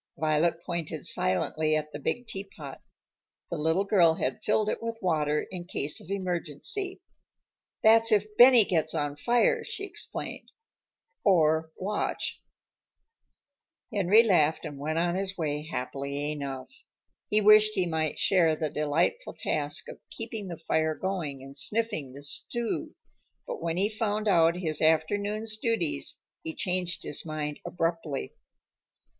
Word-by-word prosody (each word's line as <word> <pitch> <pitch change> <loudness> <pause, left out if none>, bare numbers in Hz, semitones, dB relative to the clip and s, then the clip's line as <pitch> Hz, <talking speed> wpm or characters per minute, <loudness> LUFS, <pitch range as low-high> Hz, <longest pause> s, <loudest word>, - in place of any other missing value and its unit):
Violet 160 +2 +1
pointed 165 -3 -3
silently 155 +12 +1
at 150 0 -2
the 145 - -5
big 245 - -2
teapot. 195 - -8 0.7
The - - -2
little 160 +5 +1
girl 175 -5 +4
had 130 -4 -2
filled 210 0 +2
it - - -2
with 230 0 -4
water 150 -5 0
in 180 -2 -6
case 150 -4 -2
of - - -14
emergency. 195 - -2 0.8
"That's 225 +1 +6
if 210 0 +2
Benny 245 -2 +8
gets 160 -4 0
on 145 -1 -1
fire," 245 - +2
she 395 - -5
explained 400 - -6 0.7
"or 160 -4 +3
Watch." 205 +3 -2 1.5
Henry 205 +3 +5
laughed 160 -8 +3
and 140 -2 -7
went 155 +3 -2
on 175 +1 +1
his 195 +1 -2
way 150 -2 -2
happily 140 +1 -3
enough. 135 -3 -6 0.6
He 210 - +4
wished 215 0 +6
he 185 - +2
might 160 -3 -1
share 170 -5 +3
the 155 -1 -3
delightful 150 - 0
task - - -2
of - - -9
keeping 225 -3 -6
the 170 -2 -6
fire 160 -1 0
going 160 -9 -3
and 135 0 -11
sniffing 205 - 0
the 140 +1 -10
stew, 230 - -3 0.5
but - - -6
when 165 0 -2
he 195 +2 +2
found 215 -1 -2
out 170 -3 +4
his 165 -4 -2
afternoon's 205 +8 +1
duties, 180 - -1 0.3
he 160 - -6
changed 180 -1 -1
his - - -3
mind 150 -2 -4
abruptly. 165 -4 -2
170 Hz, 140 wpm, -28 LUFS, 150-210 Hz, 1.5 s, Benny